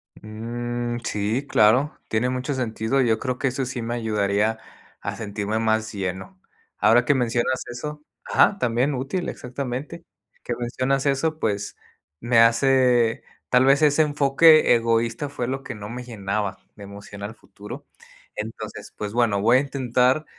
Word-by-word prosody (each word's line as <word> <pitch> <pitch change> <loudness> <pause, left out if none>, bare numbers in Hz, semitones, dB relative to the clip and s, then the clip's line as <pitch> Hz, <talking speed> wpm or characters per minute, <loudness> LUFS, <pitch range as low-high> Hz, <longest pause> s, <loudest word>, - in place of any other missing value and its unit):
Mm. 120 +2 -4
Sí, 110 +6 -1
claro, 125 +8 +3
tiene 115 +3 0
mucho 130 +3 -2
sentido. 120 0 -1
Yo 115 -3 +2
creo 130 -2 -2
que 135 - +1
eso 130 +1 -2
sí 125 -1 -5
me 120 +1 -3
ayudaría 105 -1 0 0.4
a - - -5
sentirme 105 0 -3
más 110 -1 0
lleno, 95 -1 -5 0.4
ahora 115 +3 +4
que 145 - +4
mencionas 120 0 0
eso 150 +5 -7 0.2
Ajá, 200 - +3
también, 125 +4 +1
útil, 140 +8 -3
exactamente 135 +6 -6 0.4
Que 120 - -3
mencionas 130 +3 -1
eso, 155 +3 0
pues, 105 -4 -2 0.4
me 120 0 +1
hace 120 0 +4 0.3
tal 125 +1 +4
vez 135 +3 +4
ese 150 +1 +4
enfoque 145 0 +5
egoísta 115 +3 0
fue 125 -4 -4
lo 135 +1 -3
que 125 - -6
no 105 0 -8
me 125 +2 -6
llenaba 100 -4 -3 0.2
de 100 - -11
emoción 100 0 -10
al 110 +3 -6
futuro. 105 0 -11 0.5
Entonces 110 +1 -7
pues, 105 -1 -5
bueno, 115 -4 +2
voy 115 +4 +5
a - - +4
intentar, 130 +1 +1
120 Hz, 155 wpm, -23 LUFS, 110-135 Hz, 0.5 s, enfoque